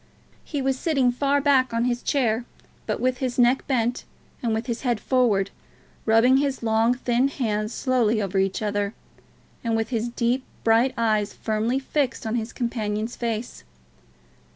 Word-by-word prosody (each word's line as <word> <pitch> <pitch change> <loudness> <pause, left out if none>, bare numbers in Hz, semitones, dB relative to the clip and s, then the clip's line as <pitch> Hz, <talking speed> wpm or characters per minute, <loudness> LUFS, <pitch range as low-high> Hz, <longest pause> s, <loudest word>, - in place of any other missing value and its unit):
He 285 -3 -3
was 265 -1 0
sitting 275 -7 +2
far 280 +3 +1
back 260 -4 +3
on 230 +1 +1
his 245 -1 0
chair, 240 -4 +1 0.4
but - - -1
with 255 0 0
his 255 -2 -2
neck 245 +1 +3
bent 245 -2 0 0.4
and 235 - 0
with 220 +1 -1
his 235 -2 -3
head 240 -5 0
forward, 220 -8 +2 0.6
rubbing 230 +4 +5
his 275 -3 -1
long 225 +2 +3
thin 245 +1 +1
hands 215 -6 -2
slowly 235 -4 +1
over 195 -2 -1
each 195 +2 0
other, 205 0 -1 0.7
and 230 -1 0
with 225 0 -1
his 235 -1 -1
deep 240 +2 0 0.2
bright 230 +3 +3
eyes 215 -3 +1
firmly 220 +3 -1
fixed 270 -2 -1
on 220 - -2
his 230 -1 -2
companion's 225 -2 -2
face. 230 - -4
235 Hz, 160 wpm, -24 LUFS, 220-255 Hz, 0.7 s, rubbing